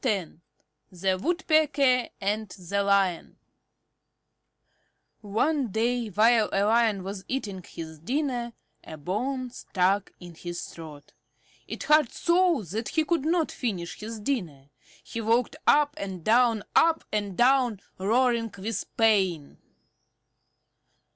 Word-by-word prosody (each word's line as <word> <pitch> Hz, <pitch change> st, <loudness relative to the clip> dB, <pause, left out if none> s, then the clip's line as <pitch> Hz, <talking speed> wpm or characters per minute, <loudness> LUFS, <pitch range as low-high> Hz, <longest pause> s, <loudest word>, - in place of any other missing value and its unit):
X 200 Hz, -, 0 dB, 0.6 s
THE 185 Hz, +1 st, -1 dB
WOODPECKER 295 Hz, -, +2 dB
AND 210 Hz, +1 st, -2 dB
THE 190 Hz, +2 st, -3 dB
LION 195 Hz, -3 st, +1 dB, 1.8 s
One 255 Hz, +7 st, 0 dB
day 230 Hz, +3 st, 0 dB
while 220 Hz, +2 st, +3 dB
a 195 Hz, -, +1 dB
Lion 220 Hz, -3 st, +2 dB
was 195 Hz, 0 st, -6 dB
eating 205 Hz, -8 st, -4 dB
his 160 Hz, -2 st, -9 dB
dinner 245 Hz, -, -2 dB, 0.3 s
a 155 Hz, -, -9 dB
bone 250 Hz, -, -3 dB
stuck 195 Hz, -3 st, 0 dB
in 175 Hz, -1 st, -11 dB
his 175 Hz, +1 st, -6 dB
throat. 150 Hz, -3 st, -11 dB, 0.5 s
It -, -, -6 dB
hurt 300 Hz, -4 st, +4 dB
so 345 Hz, -, +2 dB
that 210 Hz, +7 st, -4 dB
he 315 Hz, -1 st, +1 dB
could 330 Hz, -3 st, 0 dB
not 330 Hz, 0 st, +1 dB
finish 185 Hz, -9 st, -4 dB
his 220 Hz, +1 st, -6 dB
dinner. 170 Hz, -, -4 dB, 0.3 s
He 230 Hz, -, -5 dB
walked 230 Hz, +5 st, +1 dB
up 295 Hz, 0 st, +4 dB
and 190 Hz, -4 st, -6 dB
down, 230 Hz, 0 st, +3 dB
up 325 Hz, 0 st, +4 dB
and 205 Hz, -3 st, -2 dB
down, 250 Hz, -4 st, +3 dB, 0.2 s
roaring 230 Hz, +2 st, +1 dB
with 205 Hz, +1 st, -3 dB
pain. 190 Hz, -9 st, +2 dB
220 Hz, 120 wpm, -27 LUFS, 190-255 Hz, 1.8 s, hurt